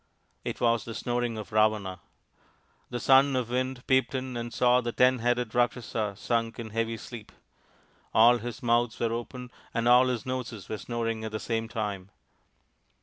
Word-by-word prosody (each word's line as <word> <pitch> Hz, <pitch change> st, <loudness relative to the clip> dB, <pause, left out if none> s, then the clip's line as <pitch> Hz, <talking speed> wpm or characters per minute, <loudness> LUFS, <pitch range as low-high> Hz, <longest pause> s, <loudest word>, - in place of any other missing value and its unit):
It -, -, -4 dB
was 115 Hz, -3 st, +2 dB
the 115 Hz, -, -7 dB
snoring 120 Hz, -2 st, -2 dB
of 110 Hz, +1 st, -7 dB
Ravana! 105 Hz, -3 st, +1 dB, 0.9 s
The 120 Hz, -, -3 dB
Son 135 Hz, +2 st, +5 dB
of 125 Hz, -2 st, -1 dB
the -, -, -5 dB
Wind 130 Hz, 0 st, -2 dB
peeped 130 Hz, -1 st, +2 dB
in 130 Hz, -1 st, -3 dB
and 120 Hz, 0 st, -4 dB
saw 125 Hz, +1 st, +3 dB
the 120 Hz, -1 st, -3 dB
ten 125 Hz, +1 st, +4 dB
headed 120 Hz, -1 st, 0 dB
Rakshasa 115 Hz, -3 st, 0 dB
sunk 115 Hz, 0 st, -1 dB
in 115 Hz, -2 st, -6 dB
heavy 115 Hz, +1 st, -1 dB
sleep. 110 Hz, -1 st, -10 dB, 0.8 s
All 120 Hz, +2 st, +6 dB
his 120 Hz, +1 st, -7 dB
mouths 120 Hz, -1 st, +1 dB
were 115 Hz, -1 st, 0 dB
open 125 Hz, +1 st, -6 dB, 0.2 s
and 115 Hz, 0 st, +1 dB
all 125 Hz, +1 st, +6 dB
his 125 Hz, 0 st, -2 dB
noses 125 Hz, -5 st, -5 dB
were 110 Hz, -, -4 dB
snoring 115 Hz, -2 st, -3 dB
at 110 Hz, -, -4 dB
the 110 Hz, -, -3 dB
same 115 Hz, 0 st, -2 dB
time. 100 Hz, -4 st, -4 dB
120 Hz, 175 wpm, -28 LUFS, 110-125 Hz, 0.9 s, All